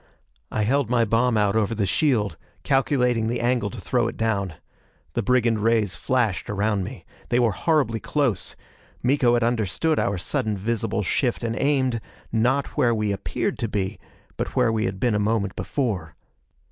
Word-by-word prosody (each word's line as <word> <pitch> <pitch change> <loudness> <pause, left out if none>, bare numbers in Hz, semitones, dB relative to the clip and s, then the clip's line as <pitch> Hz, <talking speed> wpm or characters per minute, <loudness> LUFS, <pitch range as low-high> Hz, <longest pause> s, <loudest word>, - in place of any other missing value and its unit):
I 110 - -1
held 130 +2 +1
my 120 -2 +3
bomb 115 +2 +2
out 105 -1 +2
over 110 0 +1
the 105 -2 0
shield, 105 - +1 0.3
calculating 125 -4 +2
the 120 +2 -1
angle 120 -3 +1
to 120 - -8
throw 115 +5 0
it - - -5
down. 100 -6 -1 0.6
The - - 0
brigand 120 -3 +2
rays 110 -3 +2
flashed 115 -6 0
around 105 -1 0
me. - - -8 0.2
They 120 - +2
were 120 -3 +3
horribly 130 - +1
close; 140 -8 -1 0.5
Miko 125 -2 +3
had 120 - +1
understood 120 - +1
our 100 - 0
sudden 105 +4 -1
visible 110 +1 -1
shift 120 +6 0
and 115 -1 -1
aimed, 130 -4 +1 0.3
not 125 +5 +2
where 120 -1 +3
we 105 -1 0
appeared 100 0 -2
to 115 - -1
be, 100 -3 -2 0.4
but - - -3
where 125 -3 +3
we 110 -1 0
had 95 0 -3
been 120 +2 +2
a 105 - +1
moment 105 -2 0
before. 100 - -2
115 Hz, 170 wpm, -24 LUFS, 105-125 Hz, 0.6 s, my